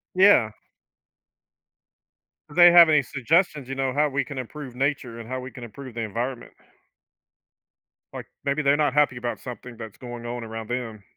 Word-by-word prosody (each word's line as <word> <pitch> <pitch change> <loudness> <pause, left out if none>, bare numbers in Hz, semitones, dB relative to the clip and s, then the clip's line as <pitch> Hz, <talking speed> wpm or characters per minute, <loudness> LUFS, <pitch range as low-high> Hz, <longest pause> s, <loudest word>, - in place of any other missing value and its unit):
Yeah. 185 - +5 2.0
Do 145 - -12
they 175 0 +9
have 170 -2 +8
any 150 - +5
suggestions, 145 - 0
you - - -2
know, 135 -1 -2
how 150 0 +2
we 140 +1 0
can 140 - -9
improve 130 0 -7
nature, 130 -4 -2
and 115 0 -9
how 130 0 -4
we 130 - -8
can 125 -2 -10
improve 125 +2 -10
the 115 - -3
environment? 120 +4 -4 1.6
Like, - - -7 0.2
maybe 140 +2 0
they're 140 +1 +3
not 145 -3 +1
happy 145 -4 +3
about 120 0 -4
something 125 -1 -9
that's 110 -2 -10
going 120 -1 -8
on 120 0 -5
around 115 0 -7
them. 115 -4 -4
130 Hz, 170 wpm, -24 LUFS, 120-145 Hz, 2.0 s, they